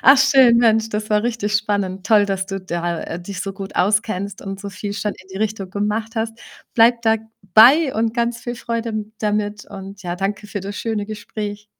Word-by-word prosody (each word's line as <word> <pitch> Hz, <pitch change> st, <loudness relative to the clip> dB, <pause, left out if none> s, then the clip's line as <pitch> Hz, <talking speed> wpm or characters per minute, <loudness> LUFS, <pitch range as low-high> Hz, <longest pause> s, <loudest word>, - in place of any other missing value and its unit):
Ach 270 Hz, +2 st, +8 dB
schön, 265 Hz, -3 st, +6 dB
Mensch, 225 Hz, -1 st, +3 dB
das 215 Hz, 0 st, -3 dB
war 210 Hz, +1 st, +2 dB
richtig 225 Hz, -3 st, -1 dB
spannend. 200 Hz, -3 st, -1 dB
Toll, 210 Hz, -2 st, +5 dB
dass 195 Hz, -1 st, -2 dB
du 195 Hz, -1 st, -4 dB
da 170 Hz, -2 st, -3 dB
dich 180 Hz, +2 st, -7 dB
so 195 Hz, -, -3 dB
gut 195 Hz, 0 st, -8 dB
auskennst 200 Hz, 0 st, 0 dB
und 195 Hz, 0 st, -6 dB
so 200 Hz, -, -6 dB
viel 200 Hz, +1 st, -5 dB
schon 205 Hz, +1 st, -2 dB
in 185 Hz, -, -18 dB
die -, -, -6 dB
Richtung 210 Hz, -3 st, -2 dB
gemacht 210 Hz, +3 st, -2 dB
hast. 225 Hz, 0 st, -3 dB, 0.3 s
Bleib 235 Hz, +1 st, +4 dB
dabei 225 Hz, -, +4 dB
und 225 Hz, 0 st, 0 dB
ganz 235 Hz, -1 st, -1 dB
viel 240 Hz, 0 st, -4 dB
Freude 230 Hz, -1 st, -3 dB
m 215 Hz, -1 st, -4 dB
damit 210 Hz, -1 st, -1 dB
und 195 Hz, 0 st, -10 dB
ja, 175 Hz, 0 st, -2 dB
danke 200 Hz, +3 st, -3 dB
für 205 Hz, -1 st, -5 dB
das 200 Hz, +2 st, -6 dB
schöne 220 Hz, -3 st, -2 dB
Gespräch. 210 Hz, 0 st, -6 dB
210 Hz, 200 wpm, -20 LUFS, 195-225 Hz, 0.3 s, Ach